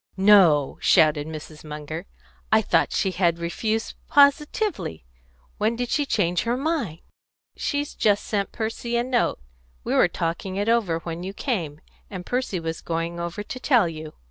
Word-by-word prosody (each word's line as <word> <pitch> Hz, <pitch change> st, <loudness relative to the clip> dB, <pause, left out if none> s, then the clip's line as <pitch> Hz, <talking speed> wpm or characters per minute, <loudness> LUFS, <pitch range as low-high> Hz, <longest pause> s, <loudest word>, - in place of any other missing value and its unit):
"No!" 190 Hz, -8 st, +5 dB
shouted 155 Hz, -4 st, +4 dB
Mrs. 155 Hz, -1 st, -9 dB
Munger. 155 Hz, +3 st, -7 dB, 0.4 s
"I 220 Hz, 0 st, +5 dB
thought -, -, +2 dB
she 190 Hz, -, 0 dB
had 175 Hz, -2 st, +1 dB
refused 215 Hz, +6 st, -2 dB
positively. 285 Hz, -, +2 dB, 0.5 s
When 220 Hz, +2 st, +1 dB
did 245 Hz, 0 st, -3 dB
she 290 Hz, -2 st, 0 dB
change 180 Hz, -6 st, +1 dB
her 235 Hz, +1 st, -1 dB
mind?" 270 Hz, -, -2 dB, 0.5 s
"She's 290 Hz, 0 st, -2 dB
just 205 Hz, -2 st, +2 dB
sent 200 Hz, -2 st, -2 dB
Percy 235 Hz, +1 st, -3 dB
a 235 Hz, -, +1 dB
note. 245 Hz, -, 0 dB, 0.4 s
We -, -, -2 dB
were -, -, +5 dB
talking 170 Hz, +3 st, -3 dB
it 205 Hz, +2 st, -1 dB
over 205 Hz, -8 st, +1 dB
when 165 Hz, 0 st, -5 dB
you 190 Hz, +2 st, -6 dB
came, 165 Hz, -, -3 dB, 0.3 s
and 185 Hz, -3 st, -7 dB
Percy 245 Hz, -7 st, -1 dB
was 165 Hz, 0 st, -4 dB
going 170 Hz, +1 st, -3 dB
over 170 Hz, +4 st, -4 dB
to 255 Hz, -, -7 dB
tell 245 Hz, -, +3 dB
you." 155 Hz, -1 st, -7 dB
195 Hz, 160 wpm, -24 LUFS, 165-235 Hz, 0.5 s, No